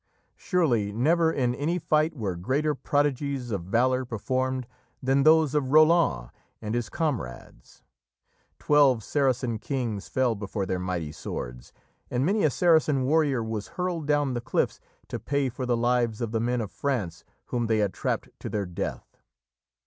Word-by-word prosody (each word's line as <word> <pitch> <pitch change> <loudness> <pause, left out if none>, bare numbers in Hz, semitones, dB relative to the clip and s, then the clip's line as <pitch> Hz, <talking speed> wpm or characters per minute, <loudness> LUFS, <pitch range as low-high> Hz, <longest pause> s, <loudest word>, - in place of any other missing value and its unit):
Surely 125 - +1
never 160 +9 +2
in 125 -5 0
any 155 +7 -1
fight 155 -1 +1
were 100 -8 -3
greater 140 - 0
prodigies 140 -3 -1
of 95 -5 -3
valour 125 +6 +2
performed 130 +2 -2 0.4
than 135 +1 +3
those 155 -1 +5
of 145 -3 0
Roland 155 - +4 0.3
and 105 0 -4
his 120 -2 -1
comrades. 120 - -5 0.7
Twelve 140 -6 +4
Saracen 125 -4 0
kings 115 -6 -3
fell 130 -3 +1
before 100 -1 -4
their 95 -1 -2
mighty 90 -4 -3
swords, 60 -4 -7 0.4
and 125 +2 0
many 205 +4 +2
a 155 - +5
Saracen 155 -3 +3
warrior 140 -3 +2
was 110 -2 -4
hurled 180 -4 -2
down 145 -3 +2
the 120 - -2
cliffs - - -1 0.3
to - - -5
pay 140 -2 0
for 125 +1 -5
the 120 -1 +2
lives 120 -2 +1
of 115 -3 -3
the 115 - 0
men 120 +1 0
of 105 - -5
France 105 -12 -3 0.3
whom 120 -2 0
they 110 -1 +2
had 105 -3 +1
trapped - - -2
to - - -6
their 105 -2 -2
death. 90 -1 -6
130 Hz, 160 wpm, -26 LUFS, 110-145 Hz, 0.7 s, those